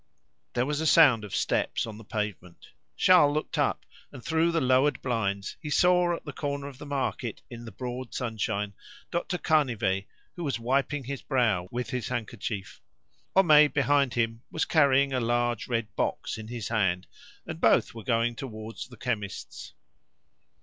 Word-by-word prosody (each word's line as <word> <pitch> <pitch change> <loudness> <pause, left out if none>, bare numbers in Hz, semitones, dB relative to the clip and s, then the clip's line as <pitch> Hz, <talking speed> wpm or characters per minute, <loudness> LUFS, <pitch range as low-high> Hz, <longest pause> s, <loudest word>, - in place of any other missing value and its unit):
There 125 +1 +1
was 150 +2 -1
a 160 - +1
sound 140 -10 +6
of 105 - -5
steps - - 0
on 110 -1 -8
the - - -11
pavement. 105 -5 -5 0.3
Charles 160 -6 +5
looked 155 - -2
up, - - 0 0.3
and 125 - -11
through 160 +1 +2
the 165 - +1
lowered 130 +1 +3
blinds 100 -6 -2
he 150 - -5
saw 180 +2 +4
at - - -11
the 145 - -6
corner 140 -1 -3
of 140 -2 -11
the 150 - -8
market 135 -5 -3
in 120 0 -8
the 115 - -8
broad 125 +4 -6
sunshine 105 -4 -2 0.4
Dr. 175 +1 -1
Canivet, 120 - +1 0.3
who 175 - -5
was 135 -7 -1
wiping 135 +4 0
his 135 +1 -5
brow 110 -10 +1
with 125 +2 -4
his 125 -4 -2
handkerchief. 110 -5 -5 0.5
Homais, 155 -6 +7
behind 140 -3 +2
him, 115 -1 0
was - - -1
carrying 140 -3 +3
a 130 - +1
large 120 0 0
red 115 -4 -2
box - - -2
in 110 - -8
his 115 -2 -5
hand, 95 -6 +1 0.4
and - - -7
both - - +4
were 115 -2 -9
going 115 0 +1
towards 110 -3 -7
the 125 -2 -14
chemist's. 105 -4 -5
125 Hz, 170 wpm, -28 LUFS, 110-145 Hz, 0.5 s, Homais